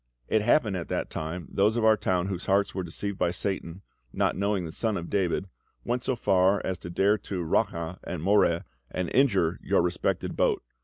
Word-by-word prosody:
It 110 - +2
happened 110 -2 +3
at 85 -3 -4
that - - -3
time 80 +2 -5
those 105 +3 +2
of 115 - +2
our 110 0 +6
town 90 -3 0
whose 95 -2 -4
hearts 100 +1 +2
were 95 - -2
deceived 95 +3 -4
by 90 - +2
Satan, 95 0 -3 0.3
not - - +1
knowing 100 -2 0
the 80 - -6
Son 110 +4 -1
of 85 -1 -6
David, 95 -1 0 0.4
went 120 +1 -1
so 130 - 0
far 95 -2 +3
as 95 -2 -2
to 85 - -8
dare 100 +4 +2
to 90 -3 -4
'raca' 85 +2 -1
and 85 -3 -5
'moreh' 95 -3 +3 0.3
and 90 -2 -3
injure 100 -12 +3
your - - +2
respected 90 0 -1
boat. - - +1
95 Hz, 200 wpm, -27 LUFS, 85-105 Hz, 0.4 s, our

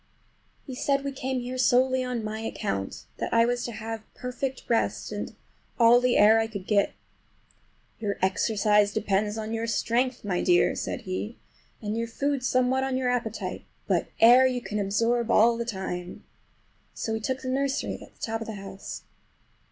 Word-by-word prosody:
He 265 - -7
said 275 +2 0
we 280 - -2
came 260 -1 -3
here 250 +1 -5
solely 255 +1 +3
on 250 -3 -3
my 215 +1 -4
account, 200 - -4
that - - -3
I 230 0 +5
was 245 0 0
to 240 - -4
have 225 0 -5
perfect 255 +1 -4
rest 230 -1 0
and - - -5 0.4
all 235 +1 +6
the 250 -1 +3
air 215 +2 +7
I 225 - +1
could 200 -4 -7
get. 200 -1 +2 1.1
"Your 205 -3 -2
exercise 210 +2 +2
depends 210 0 0
on 220 0 -4
your 225 0 -2
strength, 245 +2 0
my 180 -3 0
dear," 175 -1 +4
said - - -3
he, 200 +5 -4 0.5
"and 210 +1 -2
your 230 0 -1
food 275 +3 -1
somewhat 255 +1 +2
on 265 -1 0
your 255 -1 +1
appetite; 230 -3 -3 0.2
but - - +1
air 245 +3 +8
you 250 -1 -1
can 210 -3 -4
absorb 230 +4 +1
all 235 +1 +5
the 235 0 -3
time." 190 -5 -5 0.7
So 225 - -3
we 220 - -1
took 260 +4 -2
the 255 - -3
nursery, 275 +1 -1
at - - -14
the - - -29
top 225 0 -2
of 225 - -5
the 220 - -4
house. 195 -1 -8
230 Hz, 180 wpm, -27 LUFS, 210-250 Hz, 1.1 s, air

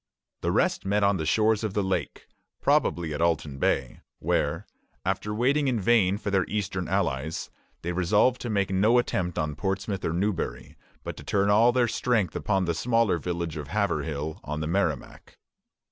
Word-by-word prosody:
The - - 0
rest - - +1
met 100 +1 +1
on 100 -1 +3
the 80 -2 -3
shores 110 +3 +2
of 105 -3 -3
the 105 - +1
lake, 95 -5 -2 0.3
probably 85 -3 +1
at 75 - -3
Alton 75 -4 0
Bay, 65 -2 0 0.2
where, - - 0 0.4
after 95 +2 -1
waiting 135 +7 +2
in 125 -4 +1
vain 100 -2 +3
for 100 - -4
their 95 -2 +3
eastern 95 -4 -2
allies, 80 -5 -1 0.3
they 85 - -2
resolved 105 +8 +2
to 120 - -4
make 100 -3 0
no 105 +6 +4
attempt 90 -7 0
on 75 -1 -1
Portsmouth 95 +3 -2
or - - 0
Newbury, 95 +1 -2 0.3
but - - -5
to - - -9
turn 100 0 +1
all 115 +4 +5
their 120 -1 +2
strength 110 -7 0
upon 95 -3 0
the 85 - 0
smaller 115 -1 +1
village 85 -3 -3
of 75 -2 -6
Haverhill, 80 -3 -2
on 75 +1 -4
the 80 - -2
Merrimac. 80 -6 -2
95 Hz, 175 wpm, -27 LUFS, 85-105 Hz, 0.4 s, all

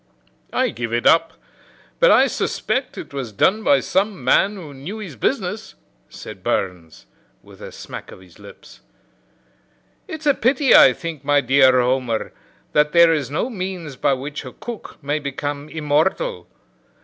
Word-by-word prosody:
"I - - +1
give 115 0 -5
it 120 - -1
up; 165 0 +4 0.7
but - - +5
I - - +6
suspect 265 - -2
it - - -9
was 130 -5 -5
done 200 - +1
by 285 +3 +4
some 195 -5 -1
man 195 +10 +3
who 160 -7 -10
knew 145 +11 -7
his 190 -10 -8
business," 110 - -3 0.3
said - - -10
Burns, 90 -4 -3 0.4
with - - -17
a - - -8
smack - - -9
of - - -12
his 90 -2 -19
lips. - - -15 1.3
"It's 315 -1 -8
a 285 - +5
pity, 265 +3 +2
I 130 - +8
think, 165 -3 -7
my 145 0 +3
dear 130 -1 +4
Homer, 125 -3 -1 0.4
that 150 0 +2
there 170 -1 +6
is 145 -5 -2
no 150 - -1
means 185 - -6
by 135 - +1
which 140 +3 -5
a 130 - -10
cook 240 -2 -9
may 145 +2 -1
become 145 +1 -5
immortal. 160 - -1
150 Hz, 160 wpm, -20 LUFS, 130-190 Hz, 1.3 s, I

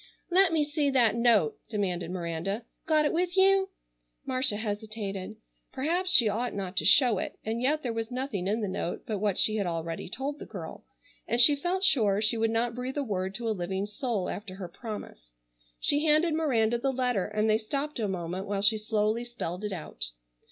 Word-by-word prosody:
"Let 375 0 +5
me 315 -2 +2
see 290 -1 0
that 245 -5 +4
note!" 230 -9 +3
demanded 180 -6 -2
Miranda. 180 +5 -3 0.2
"Got 310 -1 +3
it - - +1
with 355 +2 0
you?" 385 0 +5 0.6
Marcia 255 -5 +2
hesitated. 210 -2 -4 0.4
Perhaps 340 +7 0
she 240 -10 +8
ought 230 +4 -1
not 195 -2 -4
to - - +2
show 240 -8 +6
it, - - -5
and 225 +2 -2
yet 300 +4 +1
there 240 -3 -2
was 225 0 -3
nothing 245 -7 -3
in 215 +3 0
the 210 - -1
note 185 -2 -4
but 215 -3 -3
what 205 -2 0
she 215 0 +3
had 200 -3 -1
already 165 0 -4
told 280 +7 -4
the - - -7
girl, - - -8 0.4
and 235 - 0
she 290 +4 +8
felt 360 +6 -2
sure 215 - +3
she 220 +2 +1
would 225 0 +1
not 230 +1 0
breathe 250 +3 -5
a 285 - 0
word 190 -5 -3
to 235 -1 -3
a - - +1
living 190 0 -2
soul 210 -3 -2
after 200 -3 -6
her 190 -2 -6
promise. 205 - -8 0.5
She 290 +1 +2
handed 310 +1 +3
Miranda 240 -7 +1
the 270 +2 0
letter, 250 -7 0
and 210 +1 0
they 215 0 +3
stopped 280 +6 -3
a 215 - 0
moment 185 0 -4
while 200 0 -2
she 215 +1 +4
slowly 215 +1 0
spelled 215 -6 -6
it 210 - -3
out. 155 - -5
225 Hz, 200 wpm, -28 LUFS, 200-270 Hz, 0.6 s, she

